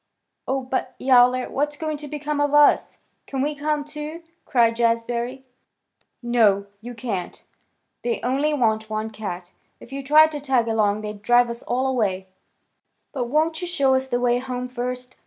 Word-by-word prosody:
"Oh, 265 +1 0
but 260 +1 -3
Yowler! 250 -1 +4
What's 295 +1 -2
going 310 -1 -3
to 295 0 -9
become 295 0 -3
of 290 0 +1
us? 295 -1 +4 0.2
Can 270 -1 -2
we 300 +1 -1
come, 295 0 -2
too?" 300 +2 -7 0.2
cried 230 -2 +3
Jazbury. 235 +2 -1 0.8
"No, 220 -5 +3 0.2
you 240 +2 -8
can't. 215 -7 -5 0.6
They 240 -1 -1
only 275 +5 +1
want 220 -6 0
one 215 +1 -3
cat. 185 -5 -6 0.3
If 250 - -13
you 275 - -4
tried 305 +3 +6
to 295 - -4
tag 265 -5 +1
along 215 -2 +1
they'd 210 -1 -7
drive 240 +2 +4
us 235 - -8
all 255 +2 -1
away." 200 -8 -1 0.8
"But 255 -4 -2
won't 315 +6 0
you 355 - -3
show 280 -7 +2
us 260 0 +1
the 245 -2 -1
way 245 0 +2
home 250 0 -4
first?" 250 0 -5
250 Hz, 170 wpm, -23 LUFS, 230-290 Hz, 0.8 s, tried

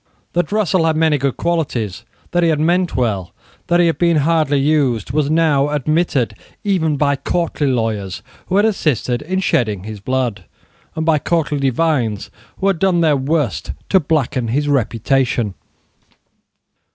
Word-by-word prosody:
That 175 0 0
Russell 190 -5 +2
had 160 - +1
many 155 -2 +2
good 135 -1 -1
qualities, 130 - -2 0.3
that 175 - +2
he 170 - +3
had 155 -2 +1
meant 175 +3 +1
well, 105 -8 -1 0.3
that 175 0 +3
he 175 - +5
had 165 - 0
been 170 -2 +3
hardly 155 -1 +2
used, 135 -6 +1
was 145 +1 0
now 150 -3 +2
admitted 150 -4 0 0.3
even 160 -7 +1
by 140 0 +2
courtly 160 0 -1
lawyers 110 -7 -2 0.2
who 185 - -1
had 205 - +4
assisted 145 - 0
in 185 +5 -2
shedding 105 - 0
his 110 0 -7
blood, 125 0 -2 0.5
and 160 - -2
by 160 -2 +3
courtly 150 -2 0
divines 135 -6 0 0.3
who 195 - -3
had 195 -4 +2
done 185 -2 +2
their 155 -3 +3
worst 135 - -1 0.2
to 190 - +5
blacken 140 -6 -1
his 145 +6 0
reputation. 125 -3 0
150 Hz, 155 wpm, -18 LUFS, 125-165 Hz, 0.5 s, he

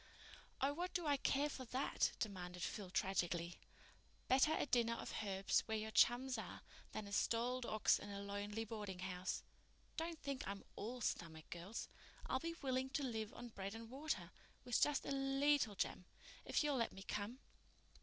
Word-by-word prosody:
"Oh, 275 +2 +3
what 355 +4 -3
do 350 -3 +1
I 290 -1 +4
care 275 +2 +3
for 275 -3 -5
that?" 255 +3 +1
demanded 180 -4 -3
Phil 200 -3 -3
tragically. 175 -2 0 0.7
"Better 270 +4 +6
a - - +2
dinner 235 -3 +3
of - - -5
herbs 195 -1 +3
where 220 -1 +1
your 220 0 -3
chums 245 +2 +5
are 205 - -6 0.3
than 215 - -3
a 200 - -8
stalled 240 +4 +2
ox 215 -1 +4
in 205 - -7
a 200 0 -4
lonely 205 +2 -2
boardinghouse. 190 -4 -3 0.5
Don't 330 0 -1
think 275 -2 -2
I'm 200 0 -4
all 240 +4 -4
stomach, 160 -6 -2
girls. 175 +6 -4 0.4
I'll - - +1
be 335 0 -3
willing 260 0 +1
to 285 +2 0
live 220 -4 -1
on 240 - -6
bread 200 -1 -4
and 225 0 -8
water—with 270 -3 -2
just 295 -1 +3
a - - -2
leetle 270 -4 +3
jam—if 180 - -2
you'll 290 -2 +2
let 230 - +1
me 195 - -8
come." 210 +5 -2
225 Hz, 165 wpm, -41 LUFS, 200-270 Hz, 0.7 s, Better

